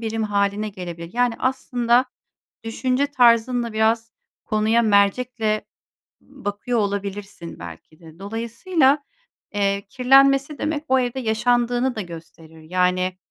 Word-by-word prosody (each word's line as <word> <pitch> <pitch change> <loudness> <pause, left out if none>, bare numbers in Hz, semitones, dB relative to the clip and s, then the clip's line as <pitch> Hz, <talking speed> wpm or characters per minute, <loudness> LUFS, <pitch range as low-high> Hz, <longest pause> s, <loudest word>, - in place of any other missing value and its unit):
birim 225 -1 -2
hâline 205 +1 0
gelebilir. 175 -3 -8
Yani 245 -1 +2
aslında, 250 -1 +1 0.6
düşünce 255 +4 0
tarzınla 240 -3 +3
biraz, 225 +1 +1 0.3
konuya 215 +2 +2
mercekle 215 +1 +1 0.6
bakıyor 240 -2 -4
olabilirsin 200 -3 -4
belki 85 - -11
de. 165 0 -15
Dolayısıyla, 235 - +1 0.5
eee, 200 -1 0
kirlenmesi 275 +4 +4
demek, 305 -1 -2
o 265 0 +3
evde 250 +1 -2
yaşandığını 240 +2 +1
da 215 - -3
gösterir. 165 -2 -12
Yani, 180 +2 0
225 Hz, 110 wpm, -22 LUFS, 200-250 Hz, 0.6 s, kirlenmesi